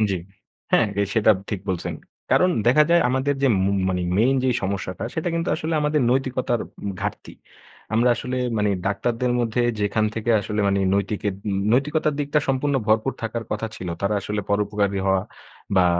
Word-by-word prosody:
জি। 95 - 0 0.6
হ্যাঁ, - - +5
এ - - +3
সেটাপ 110 -2 +5
ঠিক 100 -4 -2
বলছেন। 90 -2 -2 0.4
কারণ 180 - +4 0.2
দেখা 140 +5 +6
যায় 170 0 +5
আমাদের 130 +3 +1
যে 135 - +4 0.2
মু 100 - +2 0.2
মানে 90 -1 -1 0.2
মেইন 125 +5 +4
যেই 130 -2 +2
সমস্যাটা 95 0 -3
সেটা 160 +2 -1
কিন্তু 165 0 -1
আসলে 160 0 -2
আমাদের 150 0 +1
নৈতিকতার 130 -2 0 0.2
উম 100 - -2
ঘাটতি। 105 0 -4 0.6
আমরা 120 +2 +4
আসলে 125 +1 -4 0.2
মানে 105 0 +2 0.2
ডাক্তারদের 115 +4 0
মধ্যে 120 +1 0 0.2
যেখান 105 +1 +1
থেকে 115 +1 -1
আসলে 105 +1 -2
মানে 100 0 +2
নৈতিকের 100 0 -1
উম 100 -1 0
নৈতিকতার 150 +4 +1
দিকটা 145 +1 +1
সম্পূর্ণ 135 +2 +1
ভরপুর 110 +4 +2
থাকার 115 +1 -3
কথা 105 +1 -2
ছিল। 90 -4 -6
তারা 100 +2 +1
আসলে 105 +1 -3
পরোপকারী 100 -1 0
হওয়া 95 -1 +2 0.5
বা 95 - +6
110 Hz, 175 wpm, -23 LUFS, 100-130 Hz, 0.6 s, দেখা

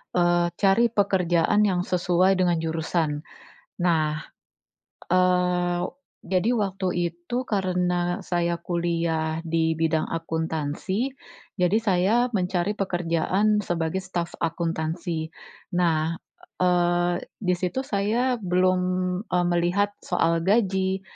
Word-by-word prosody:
eee, 175 0 +3
cari 205 +4 +4
pekerjaan 200 -1 +2
yang 180 -2 0
sesuai 180 +1 +2
dengan 175 -2 +3
jurusan 160 -2 -1 0.6
nah, 155 -3 +1 0.9
eee, 180 -1 +2 0.4
jadi 185 +4 +1
waktu 195 -3 -1 0.2
itu 175 +8 -6
karena 180 -3 0
saya 170 -1 0
kuliah 165 -2 -1
di 160 0 +1
bidang 160 0 +1
akuntansi 165 - -2 0.5
jadi 180 +4 +3
saya 190 +2 +2 0.2
mencari 180 +1 0
pekerjaan 185 +3 +1
sebagai 165 +1 -1
staf 175 -2 -4
akuntansi. 165 0 -2 0.5
Nah, 165 -2 +1 0.5
eee, 175 0 +2 0.2
disitu 180 +6 0
saya 230 +5 0
belum, 185 -1 +2 0.5
eee, 180 0 +1
melihat 180 +4 +1
soal 165 -2 +1
gaji, 190 -2 +1
175 Hz, 95 wpm, -25 LUFS, 170-190 Hz, 0.9 s, cari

